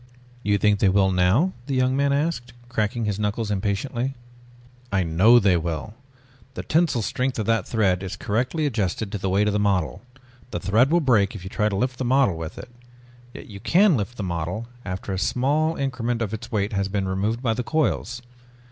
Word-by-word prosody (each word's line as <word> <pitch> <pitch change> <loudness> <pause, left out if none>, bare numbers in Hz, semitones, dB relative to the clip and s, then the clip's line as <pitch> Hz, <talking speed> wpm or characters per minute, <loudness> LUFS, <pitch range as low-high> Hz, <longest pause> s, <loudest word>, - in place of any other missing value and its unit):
"You 105 -3 +1
think 105 0 +2
they 100 - +4
will 95 0 +3
now?" 95 - +2
the 135 - -1
young 130 0 +2
man 140 0 +2
asked, 140 -5 -1 0.2
cracking 110 -1 -1
his 105 -1 -2
knuckles 105 +1 -1
impatiently. 115 +7 -2 0.8
"I 95 -2 +2
know 90 +9 +5
they 100 -6 +4
will. 85 +5 -4 0.6
The - - -5
tensile 155 -8 +1
strength 130 +5 -1
of 110 - -1
that 115 0 +1
thread 95 -5 +1
is 95 0 -5
correctly 125 +10 -1
adjusted 110 -5 -1
to 105 - -3
the 95 - -2
weight 100 +2 +2
of 105 - +1
the 105 - +1
model. 90 -10 0 0.5
The - - -3
thread 110 +7 +3
will 170 +2 +3
break 110 -9 +2
if 95 - -8
you 95 - -8
try 105 -1 +1
to 100 - -3
lift 125 +5 -1
the - - -1
model 130 -6 +3
with 80 -1 -7
it. 125 - -9 0.6
Yet - - -10
you 100 -2 -10
can 185 - +4
lift 115 +1 -3
the 105 - -3
model 90 +5 -3 0.2
after 95 +2 -5
a 95 - -2
small 145 - +1
increment 120 -4 -2
of 105 -1 -4
its 110 +2 -6
weight 105 0 -1
has 100 -1 0
been 100 -1 -2
removed 105 +6 -1
by 115 -3 +2
the 125 - -3
coils. 125 -4 -1
110 Hz, 205 wpm, -24 LUFS, 100-125 Hz, 0.8 s, know